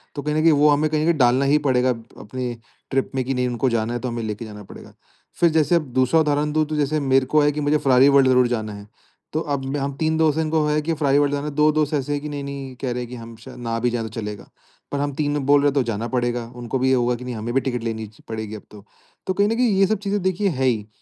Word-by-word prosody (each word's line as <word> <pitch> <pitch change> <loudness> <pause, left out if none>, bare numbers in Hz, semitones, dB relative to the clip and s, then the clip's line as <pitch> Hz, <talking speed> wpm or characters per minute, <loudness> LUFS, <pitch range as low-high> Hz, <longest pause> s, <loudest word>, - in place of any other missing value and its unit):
तो 145 - -3
कहीं 150 +1 -2
न 155 - +2
कहीं 165 +1 +5
वो 150 0 +4
हमें 150 +1 +2
कहीं 155 0 0
न - - 0
कहीं 170 -1 +2
डालना 130 +1 +3
ही 145 +2 +4
पड़ेगा 130 -1 +2
अप 115 -2 -2 0.2
अपनी 125 +3 -5 0.4
ट्रिप 135 0 0
में 130 - 0
कि 135 - -1
नहीं 125 -1 0
उनको 125 +2 0
जाना 115 0 -1
है 120 - -2
तो 125 - -4
हमें 120 -1 -3
लेके 110 +1 -4
जाना 105 -1 -10
पड़ेगा। - - -13 0.5
फिर 170 - +5
जैसे 160 +2 +3
अब 165 -3 +1
दूसरा 130 +5 +3
उदाहरण 150 -1 +1
दूँ 155 0 +2
तो 155 - -3
जैसे 150 +1 0
मेरे 135 -2 +2
को 155 +3 +3
है 145 0 +3
कि 150 +1 -4
मुझे 145 +1 +2
फेरारी 135 -1 +5
वर्ल्ड 140 -1 +5
ज़रूर 125 -1 +4
जाना 110 -3 -3
है। 100 0 -10 0.5
तो 155 - 0
अब 140 -3 -3
हम 140 0 -2
3 160 +1 0
दोस्त 160 -2 +2
है 160 - +2
इनको 155 -1 +1
है 150 0 +1
कि 165 +2 -1
फेरारी 145 -3 +2
वर्ल्ड 145 -1 +1
जाना 145 0 -2
है 150 - -5
2 150 +1 +4
दोस्त 150 0 0
ऐसे 145 0 -1
है 145 - -1
की 150 +1 -6
नहीं-नहीं 140 -2 -6
कह 130 - -2
रहे 125 +1 -3
है 120 - -5
कि 125 - -8
हम 115 -1 -10
शायद 120 +4 -12
ना 115 -1 -2
भी 120 +1 +1
जाए 120 -1 -2
तो 110 - -5
चलेगा। 105 -2 -6 0.4
पर 140 - -2
हम 145 0 -1
3 145 +1 -1
बोल 145 +1 +5
रहे 145 - +4
तो 140 0 +1
जाना 115 -1 -3
पड़ेगा। 120 -1 -1
उनको 120 +1 -3
भी 130 - +1
ये - - +4
होगा 125 0 +1
कि 125 - -9
नहीं 125 -1 -4
हमें 115 +2 -4
भी 135 - +2
टिकट 125 -2 -3
लेनी 110 -1 -3
च 105 - -21
पड़ेगी 110 -1 -5
अब 105 - -9
तो। 105 -1 -13 0.4
तो 185 - +1
कहीं 200 +2 +2
न 225 - 0
कहीं 245 0 +2
ये 195 - +6
सब 215 +2 +1
चीज़ें 200 0 -2
देखिए 190 +2 0
है, 135 -6 -1
ही 110 -5 0
135 Hz, 305 wpm, -22 LUFS, 120-150 Hz, 0.5 s, ये